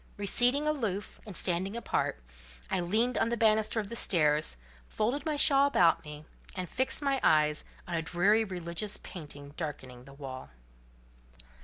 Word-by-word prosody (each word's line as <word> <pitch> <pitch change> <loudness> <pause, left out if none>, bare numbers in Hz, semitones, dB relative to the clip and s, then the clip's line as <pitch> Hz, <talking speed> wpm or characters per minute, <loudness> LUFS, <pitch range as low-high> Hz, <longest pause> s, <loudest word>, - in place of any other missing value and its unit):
Receding 245 +8 +4
aloof, 220 -10 -3
and 200 - -6
standing 190 +4 -1
apart, 235 - -2 0.5
I - - +1
leaned 220 +8 +1
on - - +1
the 235 - -1
banister 220 0 +2
of 210 - -4
the 235 - -7
stairs, 150 - +2 0.3
folded 260 +8 -2
my 305 - 0
shawl 280 -1 +5
about 175 -12 +3
me, 150 0 -10 0.3
and 185 -1 -4
fixed 260 - -1
my 275 -1 +1
eyes 150 -1 +3 0.2
on 175 - -6
a 165 - 0
dreary 185 +7 +2
religious 185 +1 -4
painting 145 -4 -10
darkening 130 -6 -7
the 135 - -13
wall. 130 - -8
195 Hz, 155 wpm, -30 LUFS, 155-235 Hz, 0.5 s, shawl